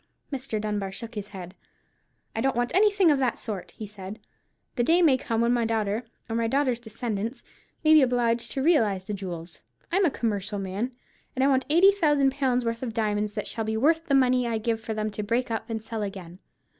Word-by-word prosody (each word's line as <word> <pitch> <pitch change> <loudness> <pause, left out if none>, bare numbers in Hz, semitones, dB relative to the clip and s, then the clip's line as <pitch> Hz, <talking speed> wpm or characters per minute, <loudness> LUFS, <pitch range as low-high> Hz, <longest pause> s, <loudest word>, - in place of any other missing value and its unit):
Mr. 260 -5 -3
Dunbar 210 -2 -2
shook 230 +4 -7
his 205 -2 -5
head. 185 -3 -9 0.8
"I 225 - -1
don't 270 0 +1
want 245 +1 0
anything 400 -3 +5
of 285 - +2
that 255 -3 +1
sort," 205 -5 -6
he 215 - -5
said; 200 0 -8 0.6
"the - - +1
day 340 +7 +4
may 295 -5 +6
come 230 -3 -1
when 235 +1 +3
my 240 -1 +2
daughter, 225 0 -1 0.2
or 225 - -3
my 230 0 +1
daughter's 260 -1 +1
descendants, 230 0 -4 0.4
may 310 0 +6
be 310 - +8
obliged 240 -2 +1
to 270 - -1
realize 220 - +3
the 210 - -4
jewels. 180 -4 -7 0.3
I'm 385 +3 +3
a - - +4
commercial 210 -5 -2
man, 195 +6 -3 0.4
and 260 - +1
I - - +5
want 265 -2 +2
eighty 350 +6 +7
thousand 295 -8 +3
pounds' 260 -3 0
worth 230 0 -2
of 235 -4 -4
diamonds 210 -2 0
that 210 - -2
shall 225 - -3
be 220 0 -2
worth 320 +7 +2
the 280 - +3
money 255 -2 +3
I 230 -1 0
give 225 0 -1
for 220 -1 -4
them 215 0 -2
to 210 - -4
break 230 +4 -1
up 225 +1 -3
and 220 -1 -3
sell 225 -1 -4
again. 190 -3 -6
230 Hz, 220 wpm, -26 LUFS, 210-265 Hz, 0.8 s, be